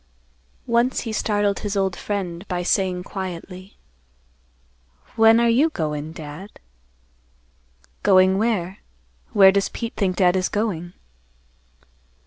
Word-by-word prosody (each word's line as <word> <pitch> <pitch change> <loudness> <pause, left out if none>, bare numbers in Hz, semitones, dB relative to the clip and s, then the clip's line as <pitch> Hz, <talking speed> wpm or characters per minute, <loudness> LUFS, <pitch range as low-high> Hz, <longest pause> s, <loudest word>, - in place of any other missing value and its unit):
Once 235 +2 +1
he 225 -2 -5
startled 205 -2 0
his 205 -1 -3
old 190 -2 0
friend 190 -3 -5
by 180 -1 -3
saying 185 -1 0
quietly, 185 0 -8 1.4
"When 225 +1 +6
are 235 - +3
you 260 +8 +3
goin', 155 - -4
Dad?" 160 +5 -9 1.5
"Going 190 0 +4
where? 205 -4 -1 0.5
Where 195 -1 +7
does 195 0 0
Pete 230 -1 -6
think 190 -3 0
Dad 180 0 +3
is 185 -1 0
going?" 180 -5 -3
195 Hz, 115 wpm, -22 LUFS, 180-210 Hz, 1.5 s, Where